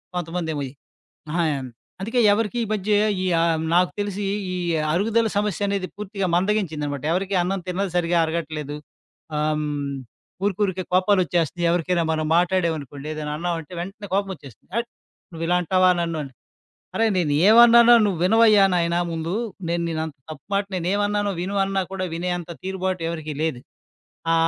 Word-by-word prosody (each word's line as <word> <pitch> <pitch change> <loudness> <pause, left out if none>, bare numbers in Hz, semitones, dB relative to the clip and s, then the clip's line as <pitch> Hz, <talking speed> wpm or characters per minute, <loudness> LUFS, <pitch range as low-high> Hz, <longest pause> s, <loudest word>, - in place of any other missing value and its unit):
కొంతమందేమో 165 -3 -3
ఈ - - -13 0.6
అహ 170 - -1 0.6
అందుకే 230 +6 0
ఎవరికి 220 +2 0
ఈ - - -6
మధ్య 210 0 -1 0.3
ఈ - - 0
ఆహ్, 165 -1 +2
నాకు 180 0 +4
తెలిసి 205 0 -3 0.3
ఈ - - -2 0.4
అరుగుదల 225 +6 +2
సమస్య 205 -1 0
అనేది 195 -2 -1
పూర్తిగా 200 -1 -3
మందగించిందన్నమాట. 160 -8 -1
ఎవరికీ 195 +2 -1
అన్నం 190 +2 -1
తిన్నది 190 +2 -1
సరిగ్గా 175 0 +2
అరగట్లేదు. 155 -3 -4 0.6
ఆహ్, 150 +1 +1
హ్మ్. 145 -2 -3 0.5
ఊరికి 205 0 -1
ఊరికే 190 -1 -2
కోపాలు 185 +2 +4
వచ్చేస్తున్నాయి. 170 0 0
ఎవరికైనా 175 0 +1
మనం 155 -1 -1
మాట్లాడాం 175 -1 +2
అనుకోండి, 140 0 -9
ఏదైనా 150 -1 -4
అన్నామంటే 170 0 -3
వెంటనే 200 +4 -7
కోపమొచ్చేస్తుంది. 190 - -4
"అట్! 235 0 -2 0.4
నువ్విలా 165 +2 0
అంటావా 185 +2 +4
నన్ను" 165 -1 -2
అని. 135 - -9 0.6
"అరె! 225 - +3
నేను 160 -5 +1 0.2
ఏవన్నానో 235 +1 +8
నువ్వు 190 -5 -1
వినవయ్యా 215 0 +6
నాయన 170 0 +1
ముందు, 165 +3 -3 0.3
నేను 170 0 0
నిన్నంత 160 -2 -4
తప్పు 155 - -11
మాట 200 0 +1
నేనేవన్నానో 205 +3 0
విను" 195 +3 -2
అన్నా 195 0 0
కూడా 185 -1 -2
వినేంత 175 0 -3
తీరుబాటు 185 -2 -2
ఎవరికీ 155 -3 -5
లేదు. 145 -7 -2 0.7
ఆ! - - +4
180 Hz, 150 wpm, -23 LUFS, 160-200 Hz, 0.7 s, ఏవన్నానో